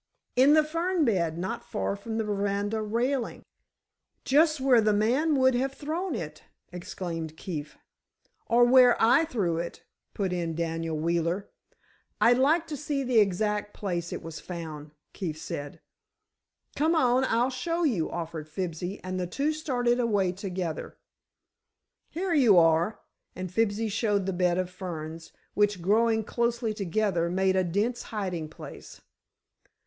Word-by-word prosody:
"In 270 Hz, +4 st, +6 dB
the 310 Hz, -, +5 dB
fern 335 Hz, +2 st, 0 dB
bed, 170 Hz, -8 st, +1 dB
not 185 Hz, +2 st, -4 dB
far -, -, -2 dB
from 220 Hz, +2 st, -5 dB
the 225 Hz, -, 0 dB
veranda 205 Hz, +1 st, -1 dB
railing." 235 Hz, +4 st, -1 dB, 0.8 s
"Just 305 Hz, +2 st, +4 dB
where 260 Hz, -3 st, +5 dB
the 215 Hz, -1 st, +3 dB
man 255 Hz, +10 st, +2 dB
would 260 Hz, -1 st, +4 dB
have 265 Hz, +2 st, 0 dB
thrown 320 Hz, +2 st, -3 dB
it!" 155 Hz, -6 st, -6 dB, 0.3 s
exclaimed 170 Hz, -3 st, -5 dB
Keefe. 150 Hz, -5 st, -6 dB, 0.7 s
"Or 235 Hz, +1 st, +5 dB
where 250 Hz, 0 st, +6 dB
I 245 Hz, +8 st, +5 dB
threw 195 Hz, -, -1 dB
it," 170 Hz, -, -6 dB, 0.3 s
put 190 Hz, -3 st, -1 dB
in 170 Hz, -2 st, -2 dB
Daniel 165 Hz, -1 st, -2 dB
Wheeler. 170 Hz, +4 st, -1 dB, 0.7 s
"I'd 245 Hz, +2 st, +5 dB
like 315 Hz, +5 st, +3 dB
to 300 Hz, -, -3 dB
see 285 Hz, -1 st, -2 dB
the 250 Hz, -3 st, +3 dB
exact 210 Hz, +1 st, 0 dB
place 175 Hz, -4 st, -3 dB
it -, -, -5 dB
was 165 Hz, -1 st, -7 dB
found," 160 Hz, -4 st, -7 dB, 0.2 s
Keefe 165 Hz, -6 st, -4 dB
said. 145 Hz, -2 st, -6 dB, 1.0 s
"Come 315 Hz, +4 st, +2 dB
on, 255 Hz, -3 st, +3 dB
I'll 240 Hz, +2 st, +1 dB
show 330 Hz, +7 st, -2 dB
you," 220 Hz, -, +1 dB
offered 165 Hz, -2 st, -5 dB
Fibsy 175 Hz, +3 st, -4 dB
and 185 Hz, 0 st, -3 dB
the 180 Hz, -, -2 dB
two 280 Hz, -, -1 dB
started 250 Hz, -6 st, 0 dB
away 205 Hz, -6 st, +2 dB
together. 180 Hz, -3 st, -5 dB, 1.1 s
"Here 355 Hz, +2 st, -2 dB
you 245 Hz, -, +6 dB
are," 165 Hz, +4 st, +3 dB, 0.3 s
and 185 Hz, -1 st, -5 dB
Fibsy 220 Hz, +1 st, +1 dB
showed 205 Hz, -2 st, 0 dB
the 190 Hz, -, -1 dB
bed 180 Hz, -1 st, +1 dB
of 185 Hz, -1 st, -2 dB
ferns, 165 Hz, -3 st, -7 dB, 0.2 s
which, 205 Hz, -2 st, +2 dB
growing 220 Hz, +5 st, +2 dB
closely 235 Hz, 0 st, -1 dB
together, 195 Hz, -3 st, 0 dB
made 190 Hz, +1 st, +1 dB
a 185 Hz, -, +3 dB
dense 205 Hz, +8 st, -1 dB
hiding 180 Hz, -7 st, -3 dB
place. -, -, -11 dB
205 Hz, 145 wpm, -27 LUFS, 175-245 Hz, 1.1 s, In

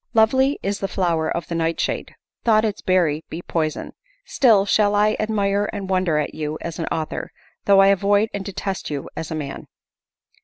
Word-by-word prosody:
Lovely 260 Hz, +6 st, +4 dB
is 200 Hz, +1 st, -2 dB
the 195 Hz, -, -2 dB
flower 170 Hz, -4 st, 0 dB
of 170 Hz, -, -3 dB
the -, -, -5 dB
nightshade, 165 Hz, 0 st, -2 dB, 0.3 s
thought 220 Hz, -1 st, +4 dB
its 210 Hz, -2 st, -3 dB
berry 165 Hz, -5 st, +1 dB
be 170 Hz, +2 st, -6 dB
poison. 155 Hz, -2 st, -2 dB, 0.3 s
Still 220 Hz, -7 st, +4 dB
shall 205 Hz, 0 st, +3 dB
I 210 Hz, +1 st, +3 dB
admire 205 Hz, -1 st, 0 dB
and 195 Hz, -2 st, -5 dB
wonder 185 Hz, -4 st, +1 dB
at 150 Hz, -, -1 dB
you 155 Hz, 0 st, -4 dB
as 170 Hz, 0 st, -6 dB
an 165 Hz, -, -2 dB
author, 155 Hz, -1 st, -3 dB, 0.4 s
though 195 Hz, -1 st, +6 dB
I 195 Hz, -, +6 dB
avoid 205 Hz, +2 st, +3 dB
and 200 Hz, -, -3 dB
detest 195 Hz, 0 st, -4 dB
you 145 Hz, -2 st, -4 dB
as 160 Hz, -, -5 dB
a 160 Hz, -, -3 dB
man. 145 Hz, -3 st, -6 dB
195 Hz, 185 wpm, -22 LUFS, 165-205 Hz, 0.4 s, though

